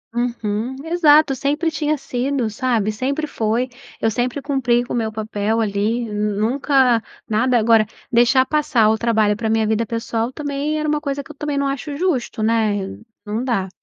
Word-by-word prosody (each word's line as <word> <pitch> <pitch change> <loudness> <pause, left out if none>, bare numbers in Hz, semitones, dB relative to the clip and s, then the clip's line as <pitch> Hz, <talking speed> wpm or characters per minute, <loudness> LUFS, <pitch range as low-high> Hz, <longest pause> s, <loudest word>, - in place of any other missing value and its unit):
uhum, 240 0 -2
exato, 310 -4 +5
sempre 295 +5 0
tinha 305 -1 0
sido 260 -1 -2
sabe, 220 -1 0
sempre 275 +8 -2
foi, 235 -3 -1 0.3
eu 225 - +1
sempre 250 +4 -2
cumpri 245 -4 +1
com 245 - -6
o - - -1
meu 225 -2 -1
papel 215 0 -2
ali, 220 +2 0
nunca 225 +4 +2 0.3
nada 240 +3 +2
agora, 225 -1 +4 0.2
deixar 245 +2 +4
passar 270 -7 +2
o 220 - +1
trabalho 220 -2 +2
pra 220 +1 -2
minha 220 0 +2
vida 220 +1 0
pessoal 230 +1 -2
também 290 +2 -2
era 305 - -2
uma 300 0 0
coisa 280 -1 -3
que 305 - -12
eu - - -14
também 295 0 -3
não 280 - +1
acho 280 +1 -4
justo, 280 -10 -1
né, 215 -3 0 0.3
não 215 +4 -2
dá. 210 -7 -1
240 Hz, 175 wpm, -20 LUFS, 220-280 Hz, 0.3 s, exato